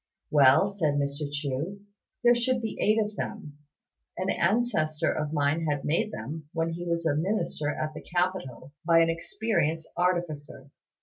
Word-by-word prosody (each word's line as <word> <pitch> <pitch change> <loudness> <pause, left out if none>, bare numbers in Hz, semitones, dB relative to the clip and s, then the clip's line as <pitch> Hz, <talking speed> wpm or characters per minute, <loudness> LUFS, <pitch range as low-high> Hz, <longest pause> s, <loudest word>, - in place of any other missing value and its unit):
"Well," 140 +5 +6
said 170 -8 0
Mr. 145 +1 -2
Chu, 145 +7 -3 0.4
"there 240 0 +7
should 245 +1 +1
be 225 -2 -4
eight 215 +1 +3
of 210 -1 -1
them. 145 -1 -6 0.6
An 185 +1 0
ancestor 170 -6 +1
of 150 -1 -2
mine 155 +2 +1
had 145 -1 0
them - - -9
made, 205 +8 +1 0.4
when 165 0 0
he 175 +1 -5
was 170 0 -1
a 150 -3 +2
minister 170 -3 -1
at 155 +1 -3
the - - -8
capital, 175 -7 -2
by 165 0 +5
an 165 0 +3
experienced 165 -2 -1
artificer. 155 -6 -2
165 Hz, 160 wpm, -28 LUFS, 145-185 Hz, 0.6 s, there